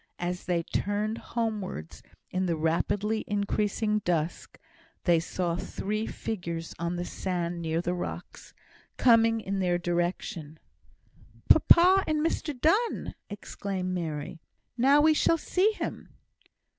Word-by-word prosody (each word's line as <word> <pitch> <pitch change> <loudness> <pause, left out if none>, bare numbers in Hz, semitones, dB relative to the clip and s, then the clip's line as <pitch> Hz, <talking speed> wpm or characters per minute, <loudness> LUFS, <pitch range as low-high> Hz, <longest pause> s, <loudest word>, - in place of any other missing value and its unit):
As 180 +1 -3
they 175 -2 0
turned 210 +5 -2
homewards 195 - -4 0.3
in 185 0 0
the 170 - +1
rapidly 200 +7 0
increasing 210 +1 0
dusk, 175 -4 -2 0.5
they 170 -2 +4
saw 170 +1 -2
three 215 +5 -3
figures 170 -6 -4
on 170 +1 -2
the 175 0 -3
sand 175 -2 -3
near 165 0 -1
the 175 0 -1
rocks, 175 - -6 0.5
coming 230 -2 +5
in 195 -1 -3
their 180 -2 +2
direction. 175 -2 -2 0.9
"Papa 370 +3 +7
and 310 0 +1
Mr 300 -4 -2
Donne!" 410 - +1 0.2
exclaimed 195 -2 -4
Mary. 160 -1 -4 0.3
"Now 275 +4 +5
we 310 +1 +5
shall 330 +2 +3
see 375 +6 +2
him!" - - -5
190 Hz, 120 wpm, -28 LUFS, 170-225 Hz, 0.9 s, Papa